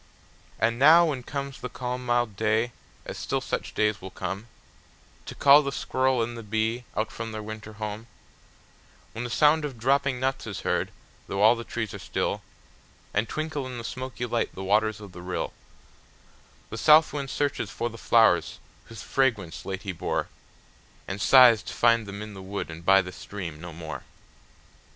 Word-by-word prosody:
And 115 +1 +1
now, 160 +5 +8
when 145 -6 -2
comes 140 +1 -5
the 125 - -4
calm 125 0 -4
mild 120 -3 +1
day, 110 +3 +1 0.3
as - - -6
still - - -1
such - - -4
days 105 -1 +1
will 95 - -7
come, 95 +4 -5 0.8
To - - -7
call 140 +1 +7
the 140 -1 -3
squirrel 130 -2 +1
and 120 +1 -4
the 115 - -6
bee 110 +3 -1 0.2
from 115 0 -6
out - - -8
their 110 0 -5
winter 110 0 -8
home; 105 +1 -6 1.0
When 115 - -5
the 120 - -4
sound 150 +4 +4
of 140 -5 -5
dropping 135 +2 +1
nuts 135 -1 -1
is 100 - -5
heard, - - 0 0.4
though 100 +1 -1
all 110 +3 +7
the 115 - -6
trees 115 -2 -4
are 100 - -7
still, - - -2 0.7
And 110 +2 0
twinkle 155 -3 -3
in 125 -1 -6
the 115 - -6
smoky 130 +1 -5
light 115 -1 -1
the 95 - -6
waters 110 +2 +2
of 100 -3 -10
the 90 0 -10
rill, 90 +1 -3 1.2
The 115 - -5
south 155 +1 +6
wind 140 -2 -3
searches 140 -7 -1
for 115 - -3
the 115 - -8
flowers 115 -1 +4 0.3
whose 115 -3 -10
fragrance 115 -11 0
late 95 0 -4
he 100 - -3
bore, 85 - -2 0.8
And 95 +1 -4
sighs 125 -4 +7
to - - -7
find 115 -2 +3
them 100 +1 -6
in 105 -1 -9
the 95 - -9
wood 95 -2 -5
and 85 +1 -9
by 95 +2 +5
the 90 - -7
stream 90 -5 -7
no 85 0 -7
more. 80 0 -7
115 Hz, 185 wpm, -26 LUFS, 100-130 Hz, 1.2 s, now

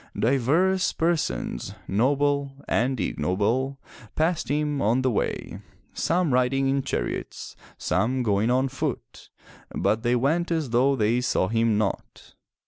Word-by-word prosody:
Divers 155 - +2
persons, 165 - -1
noble 140 +5 +1
and 125 +1 0
ignoble, 115 - -1 0.4
passed 160 +2 0
him 145 -1 0
on 120 +5 +2
the 130 - +2
way, 105 - -3 0.3
some 170 -4 +1
riding 130 +2 +2
in 135 +1 +1
chariots, 95 - -4 0.2
some 125 +3 0
going 105 0 +1
on 130 +2 +2
foot, 135 +1 -5 0.5
but 110 +1 +1
they 120 +1 +1
went 155 +8 +1
as 160 -7 -1
though 130 +4 +3
they 115 +1 +1
saw 115 -6 0
him 115 -1 +2
not. 105 -2 -4
130 Hz, 130 wpm, -25 LUFS, 115-145 Hz, 0.5 s, though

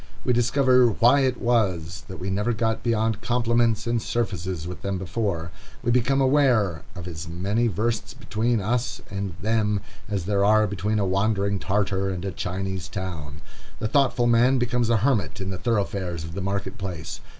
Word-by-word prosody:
We 125 - +3
discover 125 +1 +4
why 120 +5 +4
it 130 -2 +1
was 90 -9 0
that 95 - -8
we 95 +1 -4
never 105 +5 0
got 110 0 0
beyond 110 -2 0
compliments 115 -2 +1
and 115 -1 0
surfaces 95 -8 -2
with 90 - -7
them 100 -1 -2
before; 90 -3 -2 0.3
we 120 - +1
become 125 +3 +2
aware 130 - +3
of 90 -2 -7
as 80 -1 -6
many 100 +8 0
versts 110 +5 -2
between 120 -2 0
us 120 +5 -1
and 100 -3 -4
them 105 -2 +1 0.3
as 100 -5 -2
there 100 0 +1
are 110 +1 +5
between 105 +2 -1
a 100 - +1
wandering 100 +1 +1
Tartar 95 0 0
and 95 0 -4
a 95 - -2
Chinese 95 +1 -3
town. 85 -7 -6 0.4
The 110 - -2
thoughtful 125 -2 +2
man 120 +3 +4
becomes 125 -1 0
a 115 - +4
hermit 110 -3 +1
in 95 0 -3
the 95 - -4
thoroughfares 95 -5 -1
of 80 +1 -7
the 100 - -4
market 95 0 -3
place. 90 -5 -5
105 Hz, 175 wpm, -25 LUFS, 95-120 Hz, 0.4 s, are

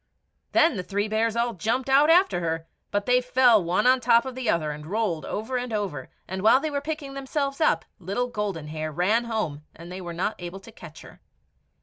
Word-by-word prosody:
Then 325 -8 +4
the - - -1
three 200 +3 -2
bears 220 +1 0
all 235 0 0
jumped 225 +7 -1
out 275 +3 +5
after 355 - +4
her, 165 -1 -2 0.2
but 205 0 -1
they 250 0 +3
fell 245 -4 +4
one 175 +6 0
on 255 +1 +5
the - - -18
top 235 0 +5
of 260 - -5
the 250 -3 -3
other 155 -5 +1
and 150 +1 -8
rolled 195 -5 -1
over 225 +5 -3
and 245 -1 -5
over, 195 -11 -3 0.2
and 190 +1 -4
while 225 +5 +6
they 310 +2 -3
were 285 -1 -2
picking 295 -2 -5
themselves 275 +1 -3
up, 235 - +2
little 195 +7 -2
Golden 200 -10 -4
Hair 155 0 -4
ran 200 +9 +1
home, 195 -11 -3
and 170 +2 -11
they 185 +1 -6
were 175 -1 -6
not 180 +6 -1
able 175 +2 -7
to 230 - -13
catch 170 -7 -12
her. - - -15
215 Hz, 225 wpm, -25 LUFS, 175-250 Hz, 0.2 s, while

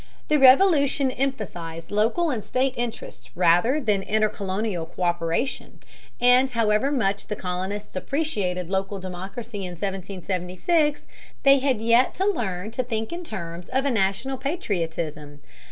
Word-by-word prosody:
The 305 - +4
Revolution 280 -1 +5
emphasized 175 -11 -4
local 230 +11 +2
and 225 -6 -3
state 260 +3 0
interests 235 -1 -5
rather 180 - +4
than 210 -8 +1
intercolonial 200 -3 -1
co÷peration, 175 +7 -2 0.5
and 250 +2 +5
however 230 +2 +1
much 205 -7 0
the 210 - -3
colonists 190 +3 -4
appreciated 185 - -2
local 195 +1 -1
democracy 190 +5 -7
in 180 -2 -5
1776, 195 - -1 0.4
they 275 0 +7
had 260 -4 +1
yet 235 +3 +3
to 380 - 0
learn 215 - -1
to 255 +3 -2
think 225 +1 -3
in 350 +1 -5
terms 170 - -7
of 265 +2 0
a 280 - +2
national 225 +5 0
patriotism. 165 - -3
215 Hz, 130 wpm, -24 LUFS, 185-265 Hz, 0.5 s, they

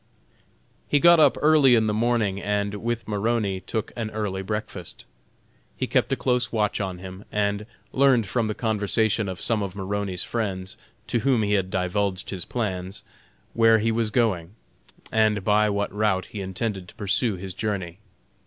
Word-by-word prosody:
He 145 - +3
got 170 +2 +7
up 155 - +5
early 150 -5 +6
in 110 -1 +3
the 105 - 0
morning 110 -3 +1
and, 100 0 -1
with 120 0 -2
Maroney, 105 -2 0
took 110 +3 -4
an 115 -2 -3
early 105 -3 -3
breakfast. 100 -3 -5 0.7
He - - -1
kept - - +1
a - - +3
close 125 -1 0
watch 105 -2 0
on 95 -2 -3
him, 95 +2 -9
and 105 0 -1 0.3
learned 130 -4 +4
from 115 +2 0
the 105 - -2
conversation 110 -1 +1
of 95 - -6
some 115 -3 0
of 100 -2 -4
Maroney's 100 -2 -2
friends, 95 -5 -3 0.3
to 120 - 0
whom 125 -2 +2
he 105 0 +1
had 95 -2 +1
divulged 95 +1 -1
his 95 -4 -4
plans, 95 -5 -4 0.5
where 115 -1 +5
he 115 +1 +1
was 115 -1 0
going, 105 -5 0 0.6
and 110 -2 +2
by 105 +1 +3
what 100 0 -1
route 105 -3 +1
he 105 - -7
intended 95 0 -3
to - - -14
pursue 105 +2 0
his 95 0 -7
journey. 95 -3 -3
105 Hz, 170 wpm, -25 LUFS, 95-115 Hz, 0.7 s, got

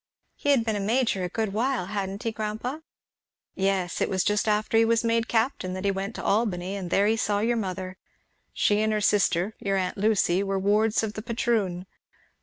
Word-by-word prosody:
"He 285 - -3
had 265 -5 +4
been 220 -2 0
a - - -1
major 220 -1 +1
a 180 - -2
good 220 0 -2
while, 240 -2 0
hadn't 195 0 -4
he, 230 - -1
grandpa?" 220 +6 -4 0.7
"Yes. 190 -2 -1
It - - +1
was 190 -1 +1
just 210 +2 +1
after 215 +1 +1
he 225 - +6
was 230 +1 +2
made 230 0 +1
captain 225 -5 0
that 185 +1 -5
he 200 - +3
went 195 +3 -4
to - - -6
Albany, 195 -3 0
and 190 -3 -5
there 200 +3 +3
he 220 +2 +3
saw 210 -2 0
your 235 +3 +1
mother. 185 -2 -4 0.5
She 205 0 +2
and 220 0 +1
her 215 - +1
sister, 200 -1 +2
your 195 -1 0
aunt 185 +1 -2
Lucy, 200 -3 +2
were 195 -1 -1
wards 210 +3 +2
of 215 -1 -2
the 215 - -5
patroon. 220 -6 -1
210 Hz, 210 wpm, -26 LUFS, 195-225 Hz, 0.7 s, he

